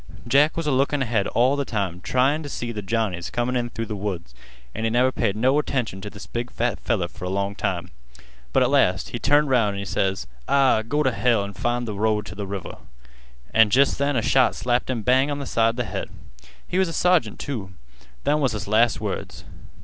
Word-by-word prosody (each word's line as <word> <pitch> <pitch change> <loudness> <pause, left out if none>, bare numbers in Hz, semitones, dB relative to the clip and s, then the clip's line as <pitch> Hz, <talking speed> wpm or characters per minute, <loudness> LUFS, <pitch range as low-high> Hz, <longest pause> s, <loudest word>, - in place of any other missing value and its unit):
Jack 145 +6 +4
was 165 - -1
a 150 - +1
lookin' 135 +1 +1
ahead 110 -5 0
all 125 +4 +2
th' - - -14
time 95 -5 -2
tryin' 135 +8 +1
t' 145 - -7
see 120 -3 -4
th' 105 -2 -5
Johnnies 105 -7 -1
comin' 120 0 -1
through 115 0 -4
th' 110 - -10
woods, 95 -9 -4 0.4
an' 110 - -4
he 115 - +2
never 125 +3 +3
paid 110 -5 -1
no 130 +6 +3
attention 120 -9 -2
t' 105 - -6
this 105 - -10
big 120 +1 -4
fat 120 +1 -1
feller 100 -7 0
fer 90 - -9
a - - -2
long 100 +1 -1
time, 90 -3 -3 0.6
but - - +4
at - - +1
last - - +2
he - - -4
turned 145 0 +3
'round 110 -6 +3
an' - - -5
he 100 - -4
ses: 95 0 -1 0.2
'Ah, 135 -5 +4
go 145 +7 0
t' 130 - +2
hell 115 -1 +2
an' 100 0 -6
find 120 +3 -1
th' 110 - -4
road 105 0 0
t' - - -8
th' 105 - -13
river!' 100 -1 -6 0.8
An' 110 -1 +6
jest 135 +6 +3
then 140 0 +1
a 115 - +1
shot 130 +1 +3
slapped 120 +1 0
him 120 -4 -2
bang 130 +5 +3
on 145 0 -2
th' 140 - -5
side 115 +1 +1
th' 125 - -1
head. 95 -1 -5 0.6
He 185 - 0
was 190 - +3
a 165 - -5
sergeant, 175 - +2
too. 110 -9 -5 0.5
Them 150 +1 +2
was 135 -6 +1
his 105 0 -5
last 110 +3 +3
words. - - -5
120 Hz, 225 wpm, -23 LUFS, 105-130 Hz, 0.8 s, An